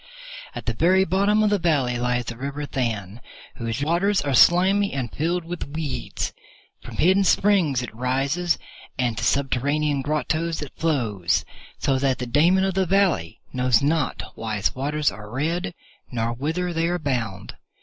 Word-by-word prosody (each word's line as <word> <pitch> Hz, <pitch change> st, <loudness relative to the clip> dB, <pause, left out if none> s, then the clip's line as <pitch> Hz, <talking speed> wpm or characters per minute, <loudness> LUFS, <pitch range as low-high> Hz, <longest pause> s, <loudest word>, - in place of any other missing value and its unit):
At -, -, -6 dB
the -, -, 0 dB
very 190 Hz, +3 st, +3 dB
bottom 200 Hz, +4 st, +2 dB
of 210 Hz, -, +2 dB
the 205 Hz, -, +2 dB
valley 140 Hz, -8 st, +1 dB
lies 120 Hz, 0 st, 0 dB
the 120 Hz, -, -5 dB
river 140 Hz, +4 st, -4 dB
Than, 115 Hz, -5 st, -3 dB, 0.4 s
whose 115 Hz, +3 st, -3 dB
waters 180 Hz, +6 st, +2 dB
are 140 Hz, -2 st, -1 dB
slimy 190 Hz, +8 st, +5 dB
and 130 Hz, -5 st, -3 dB
filled 170 Hz, +3 st, -1 dB
with 175 Hz, -2 st, -5 dB
weeds. 140 Hz, -7 st, -3 dB, 0.5 s
From -, -, -10 dB
hidden 190 Hz, +4 st, +4 dB
springs 180 Hz, -10 st, +3 dB
it 120 Hz, -, -7 dB
rises, 135 Hz, +8 st, 0 dB, 0.4 s
and 120 Hz, -3 st, 0 dB
to -, -, -4 dB
subterranean 140 Hz, +3 st, +1 dB
grottoes 155 Hz, +3 st, -1 dB
it 145 Hz, -, -10 dB
flows, 115 Hz, -, 0 dB, 0.3 s
so 135 Hz, -1 st, +1 dB
that 135 Hz, -1 st, +1 dB
the 125 Hz, -, -4 dB
Daemon 165 Hz, +9 st, +3 dB
of 195 Hz, 0 st, +1 dB
the 190 Hz, 0 st, +1 dB
Valley 180 Hz, -, +1 dB
knows 125 Hz, -2 st, +2 dB
not 150 Hz, 0 st, 0 dB
why 110 Hz, -1 st, -4 dB
its 100 Hz, -, +1 dB
waters 145 Hz, +3 st, 0 dB
are 105 Hz, 0 st, -10 dB
red, 165 Hz, -, -2 dB, 0.4 s
nor 115 Hz, -1 st, -1 dB
whither 165 Hz, +8 st, -2 dB
they 165 Hz, 0 st, +1 dB
are 175 Hz, +1 st, 0 dB
bound. 120 Hz, -, -3 dB
145 Hz, 165 wpm, -23 LUFS, 125-175 Hz, 0.5 s, slimy